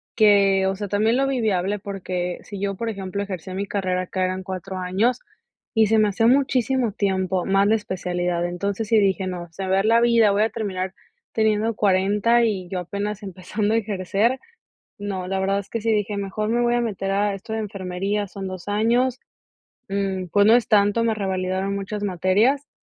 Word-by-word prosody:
que, 200 -3 +5
o 195 - 0
sea, 205 +1 -4
también 215 +4 +2
lo 270 +1 +2
vi 265 -3 -1
viable 200 -1 0
porque 180 -3 -4
si 200 -2 -8
yo, 200 0 -2
por 230 +4 -3
ejemplo, 200 -1 -4
ejercía 185 -2 -6
mi 195 +2 -2
carrera 185 -2 -1
acá 185 +1 -2
eran 185 0 -3
4 190 0 -6
años, 195 +7 0 0.5
y 220 -2 +4
se 220 +1 +3
me 210 - +4
hacía 205 +3 +1
muchísimo 260 -2 +2
tiempo, 190 -2 0
más 195 +1 +3
la 220 - +4
especialidad. 180 -4 -2
Entonces 200 +4 -3
sí 225 - +3
dije: 195 -2 +2
"no, 180 -2 -5
se 195 +4 -6
me - - -4
va 190 - +3
a - - +4
ir - - -3
la 230 +1 +4
vida, 230 -3 +4
voy 205 +1 +2
a 220 - +3
terminar 190 -4 -3 0.4
teniendo 220 0 +1
40 205 +4 +3
y 195 -5 -1
yo 185 -1 -3
apenas 205 +4 -4
empezando 205 +3 -2
a - - +4
ejercer", 210 +3 0 0.6
no, 195 -3 -4
la 195 0 -1
verdad 195 +1 +1
es 200 - -13
que 230 - -2
sí 225 +1 +1
dije: 210 0 0
"mejor 200 +2 -3
me 240 +1 +1
voy 240 0 +2
a 240 - +2
meter 195 -4 -2
a 205 +1 +1
esto 195 +3 -8
de 220 - -1
enfermería, 195 0 -3
son 195 0 -6
2 185 0 -8
años, 235 +5 +1 0.7
mm, 195 -2 -2
pues, 200 +4 +3
no 225 - +7
es 245 - +2
tanto", 205 +1 +3
me 230 -1 +1
revalidaron 190 -1 -2
muchas 205 +1 -4
materias 205 - +2
200 Hz, 205 wpm, -23 LUFS, 190-220 Hz, 0.7 s, no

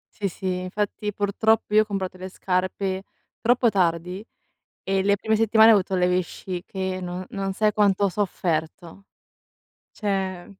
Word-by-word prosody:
Sì, 200 -2 -2
sì, 185 0 -3
infatti 210 +2 -3
purtroppo 210 +1 +1
io 215 - +7
ho - - -13
comprato 190 -3 -4
le 185 +1 -7
scarpe 185 +1 -2 0.4
troppo 240 0 +3
tardi 180 +1 -1 0.6
e 195 0 +1
le 200 +1 +3
prime 220 +2 0
settimane 220 0 +6
ho - - +8
avuto 190 -1 0
le 180 -1 +2
vesciche, 185 +1 -3
non 180 +1 -5
non 195 -1 -3
sai 215 +2 +2
quanto 200 -1 +2
ho 200 - +3
sofferto. 175 -1 -3 0.9
Cioè 190 -4 -2
195 Hz, 145 wpm, -24 LUFS, 185-205 Hz, 0.9 s, ho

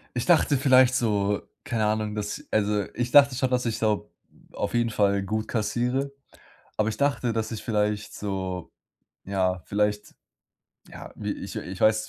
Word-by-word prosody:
Ich 125 - -1
dachte 160 -4 +4
vielleicht 130 -1 +5
so, 105 -4 +1 0.2
keine 115 -6 -1
Ahnung, 105 0 -1
dass 105 -1 -4
also, 105 -1 +1
ich 120 +1 -2
dachte 140 -1 +7
schon, 130 +1 0
dass 125 0 +1
ich 115 -2 -1
so 110 -2 -1 0.4
auf - - -3
jeden 120 -1 +2
Fall 100 -2 +2
gut 110 +2 -2
kassiere, 125 +5 -1 0.7
aber 110 0 +1
ich 110 - -3
dachte, 135 -3 +1
dass 110 -1 -2
ich 110 - -5
vielleicht 105 -2 -1
so, 95 -3 -4 0.5
ja, 95 -2 0
vielleicht, 105 0 -1 0.7
ja, - - -10
wie - - -3
ich - - -7
ich 90 +1 -6
weiß, 110 0 +3
110 Hz, 165 wpm, -26 LUFS, 105-125 Hz, 0.7 s, dachte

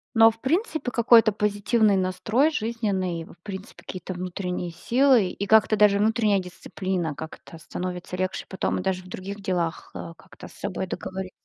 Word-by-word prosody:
Но 225 0 +8
в 225 - -18
принципе 315 - -1
какой-то 230 -2 +5
позитивный 210 0 +2
настрой, 215 +10 +2
жизненный, 205 - -2
в - - -15
принципе 190 -1 -8
какие-то 185 0 -6
внутренние 180 0 -4
силы. 240 +5 +3
И 200 - -4
как-то 220 +1 +5
даже 205 -1 +5
внутренняя 215 -2 +3
дисциплина, 180 -2 -3
как-то 160 +2 -9
становится 180 +2 -5
легче 185 +1 -2
потом, 190 -1 -2
даже 185 -1 -1
в - - -14
других 200 +2 -7
делах, 175 -4 -2
а, 165 - -7
как-то - - -14
с - - -15
собой 190 -1 -4
договори 190 +1 -5
195 Hz, 155 wpm, -25 LUFS, 185-220 Hz, -, Но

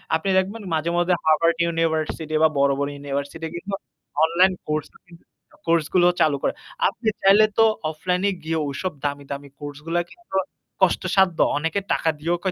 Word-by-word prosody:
আপনি 180 +5 -1
দেখবেন 200 +4 -1
মাঝে, 160 +2 -1
মাঝে 175 +1 +2
হার্ভার্ড 165 +1 +3
ইউনিভার্সিটি 160 -1 -1
বা 160 - +6
বড়, 140 0 +4
বড় 140 0 0
ইউনিভার্সিটি 140 +3 -4
কিন্তু 195 +3 -6 0.5
অনলাইন 180 +3 +4
কোর্স 150 0 -1
ও - - -15
কিন্তু 170 -1 -17 0.4
কোর্সগুলো 170 +2 +3
চালু 145 -3 +3
করে। - - +1 0.4
আপনি 225 -1 -7 0.2
চাইলে 200 +3 +7
তো 225 - +7 0.3
অফলাইন 180 +4 -2
এ - - 0
গিয়ে 160 0 -1
ঐসব 170 +6 -3
দামি, 145 0 -2
দামি 140 0 -6
কোর্সগুলা 150 +4 -3
কিন্তু 350 - -11 0.5
কষ্টসাধ্য। 185 -1 +3 0.2
অনেকে 165 +5 0
টাকা 165 - +1
দিয়েও 170 +3 0
165 Hz, 160 wpm, -23 LUFS, 150-185 Hz, 0.5 s, চাইলে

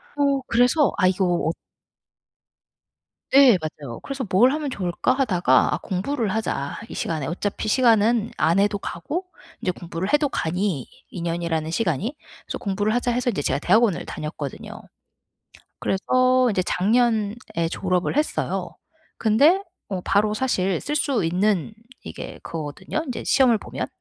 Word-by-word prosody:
어 280 -1 +2
그래서 250 +6 +3
아 185 - +4
이거 185 +1 +1
어 170 -3 +1 1.8
네. 265 -7 +7
맞아요. 145 -6 -7
그래서 275 -2 -4
'뭘 245 +8 +5
하면 300 -1 -2
좋을까?' 185 -2 -1
하다가 180 - +2
'아 - - 0
공부를 215 +4 -2
하자. 215 -10 -2
이 - - -8
시간에.' 155 -4 -2
어차피 200 +7 -3
시간은 230 -1 +3
안 165 +5 +3
해도 205 0 +2
가고 295 - -4 0.4
이제 180 - 0
공부를 175 +2 -5
해도 295 -1 +3
가니, 175 - -2 0.2
2 175 - -7
년이라는 165 -2 -2
시간이. 205 - -1 0.3
그래서 - - -5
'공부를 205 +2 -1
하자.' 245 0 +1
해서 245 +1 0
이제 185 - -2
제가 - - 0
대학원을 215 -1 +2
다녔거든요. 150 -2 -6 1.1
그래서 255 +5 +2
이제 190 -3 +1
작년에 220 +1 +1 0.3
졸업을 185 +4 -1
했어요. 300 +1 -1 0.4
근데 290 - +4 0.4
바로 210 +1 +2
사실 195 -7 0
쓸 295 +1 -3
수 270 - +1
있는 185 +3 +1 0.3
이게 - - -8
그거거든요, 160 - -4
이제 250 - -4
시험을 250 -5 +4
보면. - - -5
205 Hz, 305 characters per minute, -23 LUFS, 175-250 Hz, 1.8 s, 네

